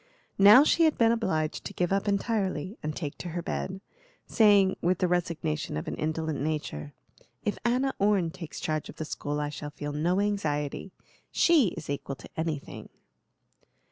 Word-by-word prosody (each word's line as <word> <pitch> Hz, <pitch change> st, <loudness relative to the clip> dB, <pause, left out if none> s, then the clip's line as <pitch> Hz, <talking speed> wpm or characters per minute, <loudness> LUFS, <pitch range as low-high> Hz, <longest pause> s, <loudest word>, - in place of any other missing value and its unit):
Now 210 Hz, +7 st, +9 dB
she 330 Hz, +2 st, +4 dB
had 315 Hz, -, +2 dB
been 230 Hz, -1 st, +4 dB
obliged 160 Hz, -9 st, -1 dB
to -, -, -7 dB
give 180 Hz, +1 st, 0 dB
up 195 Hz, +1 st, 0 dB
entirely 200 Hz, -3 st, -1 dB
and 155 Hz, 0 st, -4 dB
take 145 Hz, -4 st, -5 dB
to 175 Hz, -, -5 dB
her 170 Hz, -, -3 dB
bed, 190 Hz, 0 st, -4 dB, 0.4 s
saying, 205 Hz, -3 st, +4 dB
with 180 Hz, +1 st, +2 dB
the 180 Hz, -, +1 dB
resignation 165 Hz, -, -1 dB
of 75 Hz, -, -5 dB
an -, -, -3 dB
indolent 155 Hz, -1 st, -2 dB
nature: 145 Hz, -, -3 dB, 0.5 s
"If 210 Hz, -, -1 dB
Anna 255 Hz, +3 st, +1 dB
Orne 195 Hz, -4 st, +2 dB
takes 170 Hz, -3 st, -8 dB
charge 155 Hz, -1 st, -2 dB
of -, -, -9 dB
the 160 Hz, -, -5 dB
school 150 Hz, -1 st, -3 dB
I 150 Hz, 0 st, -2 dB
shall 150 Hz, 0 st, -6 dB
feel 145 Hz, 0 st, -6 dB
no 170 Hz, +6 st, +1 dB
anxiety. 185 Hz, -5 st, -1 dB, 0.4 s
She 320 Hz, -9 st, +4 dB
is -, -, -7 dB
equal 140 Hz, -1 st, -4 dB
to -, -, -13 dB
anything." 160 Hz, -3 st, -4 dB
175 Hz, 170 wpm, -28 LUFS, 150-205 Hz, 0.5 s, Now